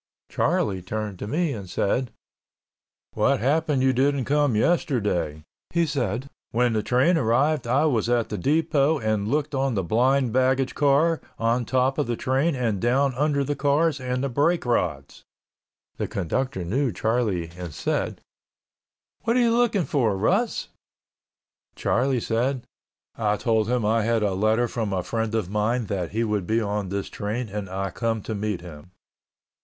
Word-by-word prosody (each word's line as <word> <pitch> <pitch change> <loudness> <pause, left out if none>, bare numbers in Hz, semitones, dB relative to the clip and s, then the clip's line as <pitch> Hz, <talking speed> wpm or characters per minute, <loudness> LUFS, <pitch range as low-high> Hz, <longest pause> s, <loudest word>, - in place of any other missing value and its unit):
Charlie 95 -3 0
turned 105 0 -4
to - - -5
me 155 +4 0
and 100 -4 -7
said, 120 +7 0 1.0
"What - - +2
happened 145 +2 +1
you 130 0 +3
didn't 135 0 +1
come 145 -3 +2
yesterday?" 105 - 0 0.3
He 170 0 +1
said, 125 -4 -2 0.2
"When 120 0 +1
the 110 - +1
train 130 +10 +3
arrived 130 +3 +1
I 135 +6 +3
was 120 -6 +1
at 120 -2 +1
the 105 - -3
depot 155 - +2
and 110 -4 -1
looked 145 +4 -1
on 135 -2 0
the 95 - 0
blind 125 +5 +2
baggage 130 +1 +2
car, 150 +3 +2 0.2
on 115 +2 +1
top 130 +4 +1
of 145 - 0
the 120 - -1
train 135 +7 0
and 115 -6 -1
down 130 +3 +2
under 140 +2 +1
the 145 +2 -2
cars 145 +2 +1
and 125 0 -2
the - - +1
brake 150 +7 +1
rods." 75 - -1 0.7
The - - -2
conductor 95 - -2
knew 125 +8 0
Charlie 105 -5 -1
and 90 -2 -7
said, - - -2 1.0
"What 230 +1 +2
are - - +4
you 230 -1 +3
looking 230 -7 +2
for, 115 -9 +1
Russ?" - - 0 1.1
Charlie 130 -1 +1
said, 120 +3 -1 0.5
"I 105 -2 0
told 110 -2 +1
him 125 -3 +1
I 115 +2 +2
had 115 0 +1
a 100 -2 +1
letter 110 +5 +2
from 110 -4 -3
a 90 -2 -1
friend 115 +3 -2
of 100 -4 -2
mine 110 +3 0
that 95 -4 -3
he 115 +2 -1
would 105 -5 -1
be 110 +1 +2
on 105 -3 -2
this 100 +1 -3
train 110 +3 -4
and 100 -1 -5
I 95 +1 -3
come 115 -3 -2
to 110 - -4
meet 105 -3 -2
him." 85 -1 -11
120 Hz, 170 wpm, -24 LUFS, 105-140 Hz, 1.1 s, are